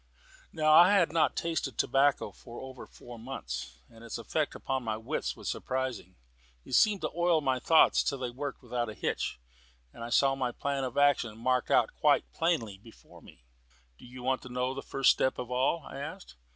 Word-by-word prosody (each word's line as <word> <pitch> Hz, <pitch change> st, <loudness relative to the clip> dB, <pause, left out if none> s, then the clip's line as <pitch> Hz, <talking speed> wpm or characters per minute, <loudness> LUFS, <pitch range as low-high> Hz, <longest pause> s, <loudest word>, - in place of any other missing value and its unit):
Now 155 Hz, -1 st, +3 dB
I 175 Hz, +5 st, +8 dB
had 175 Hz, -6 st, +3 dB
not 165 Hz, -1 st, +2 dB
tasted 160 Hz, -7 st, -2 dB
tobacco 135 Hz, +2 st, +2 dB
for 120 Hz, -1 st, -12 dB
over 130 Hz, -1 st, -9 dB
four 120 Hz, -1 st, -12 dB
months, 60 Hz, -, -7 dB
and 115 Hz, +7 st, -16 dB
its 115 Hz, -, -5 dB
effect 145 Hz, +7 st, -2 dB
upon 135 Hz, -1 st, -3 dB
my 110 Hz, -3 st, -3 dB
wits 110 Hz, -, -3 dB
was -, -, -9 dB
surprising. 130 Hz, -8 st, -3 dB, 0.5 s
It -, -, -9 dB
seemed 205 Hz, -, +4 dB
to 155 Hz, -, -2 dB
oil 170 Hz, -1 st, +3 dB
my 130 Hz, -3 st, 0 dB
thoughts 160 Hz, +4 st, +5 dB
till 140 Hz, -, -1 dB
they 125 Hz, -2 st, -4 dB
worked 140 Hz, +2 st, -6 dB
without 120 Hz, -2 st, -2 dB
a 110 Hz, -, -8 dB
hitch, -, -, -3 dB, 0.5 s
and -, -, -9 dB
I 120 Hz, -, -5 dB
saw 135 Hz, +3 st, +3 dB
my 130 Hz, -3 st, -2 dB
plan 140 Hz, -1 st, -2 dB
of 125 Hz, -, -6 dB
action 135 Hz, -6 st, +2 dB
marked 125 Hz, +2 st, 0 dB
out -, -, +3 dB
quite -, -, +2 dB
plainly 130 Hz, -, -1 dB
before 115 Hz, +2 st, -17 dB
me. -, -, -17 dB, 0.6 s
"Do -, -, -13 dB
you 125 Hz, 0 st, -10 dB
want 130 Hz, 0 st, 0 dB
to 130 Hz, -, -10 dB
know 125 Hz, +1 st, -1 dB
the 135 Hz, -, -6 dB
first 135 Hz, -1 st, +3 dB
step 130 Hz, -, 0 dB
of 125 Hz, 0 st, -6 dB
all?" 130 Hz, +6 st, +1 dB
I 135 Hz, -, -8 dB
asked. -, -, -8 dB
130 Hz, 200 wpm, -30 LUFS, 120-145 Hz, 0.6 s, I